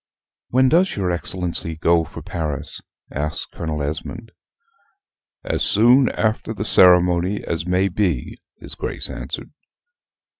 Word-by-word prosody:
"When 130 +2 +3
does 175 +7 +2
your 95 -3 -1
Excellency 85 -2 -3
go 85 +1 +2
for - - -10
Paris?" 75 -5 -3 0.3
asks 75 +3 -3
Colonel 75 -2 -5
Esmond. 80 +10 -5 1.1
"As - - -2
soon 125 +5 +4
after 110 0 -1
the 105 - -4
ceremony 90 +1 +5
as 85 +1 -3
may 90 +2 +2
be," 90 -8 -1 0.2
his - - -10
Grace - - -5
answered. - - -6
90 Hz, 120 wpm, -21 LUFS, 80-110 Hz, 1.1 s, ceremony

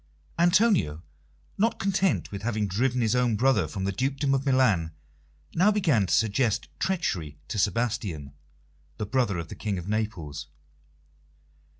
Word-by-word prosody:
Antonio, 175 - +3 0.6
not 225 +2 +2
content 195 -1 0
with 100 -1 -5
having 110 -1 -1
driven 120 +6 0
his 110 -2 +2
own 125 -3 +2
brother 110 -6 +2
from 95 +5 -5
the 100 - 0
dukedom 135 +6 0
of 135 +1 0
Milan, 105 -12 +2 0.6
now 185 +5 +4
began 160 - +2
to - - -4
suggest 115 +1 +1
treachery 90 - -1
to 105 - -2
Sebastian, 100 - -1 0.6
the 105 - -3
brother 110 -4 0
of 85 -1 -5
the - - -7
King 105 -3 -3
of 90 +1 -6
Naples. 105 -9 -3
110 Hz, 140 wpm, -27 LUFS, 95-135 Hz, 0.6 s, now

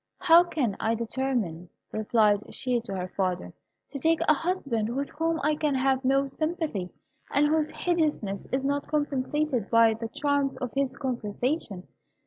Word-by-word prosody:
"How 345 -1 +7
can 280 - -1
I 225 +1 +1
determine," 230 -8 -2 0.2
replied 215 -1 +1
she 250 -2 0
to 210 -4 -6
her 180 -1 -3
father, 180 - -2 0.4
"to 280 - -5
take 325 +4 +2
a 305 - +7
husband 280 - -1
with 275 +1 -2
whom 325 +2 -1
I 305 +1 +3
can 300 -2 0
have 265 0 +1
no 275 +1 +3
sympathy, 310 - -3 0.4
and 285 +1 +3
whose 310 0 +1
hideousness 305 - -1
is 265 +1 0
not 285 +1 -1
compensated 290 -4 0
for - - -25
by 230 -1 +5
the 225 +1 -5
charms 285 +2 0
of 250 -3 -4
his 275 -1 -1
conversation? 240 - -3
265 Hz, 160 wpm, -27 LUFS, 225-300 Hz, 0.4 s, How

